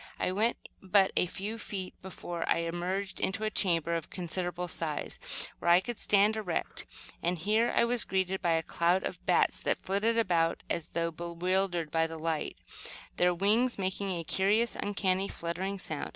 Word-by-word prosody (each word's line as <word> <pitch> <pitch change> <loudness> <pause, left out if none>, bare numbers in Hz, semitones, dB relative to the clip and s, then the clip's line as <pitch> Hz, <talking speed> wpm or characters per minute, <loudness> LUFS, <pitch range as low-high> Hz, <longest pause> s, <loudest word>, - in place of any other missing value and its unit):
I - - +1
went 220 +5 +1 0.2
but 190 0 +4
a 180 - +3
few 210 +6 -5
feet 190 -3 -5
before 175 -2 -5
I - - +3
emerged 180 +4 -2
into 205 +3 -1
a 215 - 0
chamber 170 -5 +1
of 165 -2 -2
considerable 180 0 -2
size, 160 -3 -3 0.4
where 170 - 0
I 175 +1 +8
could 240 +4 -5
stand 205 +1 +4
erect; 205 -6 -2 0.3
and 175 +1 0
here 215 +7 +2
I - - +5
was 240 0 +2
greeted 190 0 0
by 170 -3 +2
a 165 0 +1
cloud 175 +4 +2
of - - -5
bats - - +3
that - - -1
flitted 210 +4 +1
about 170 -7 +2
as 165 -1 -1
though 170 -1 -1
bewildered 175 0 -1
by 165 0 +2
the 165 0 -7
light, 160 -1 -2 0.6
their 180 0 +4
wings 215 +8 +2
making 195 +1 -2
a 175 -3 -2
curious, 205 +8 +2
uncanny 195 -1 0
fluttering 185 +4 -3
sound. 160 -5 -4
185 Hz, 175 wpm, -31 LUFS, 170-200 Hz, 0.6 s, I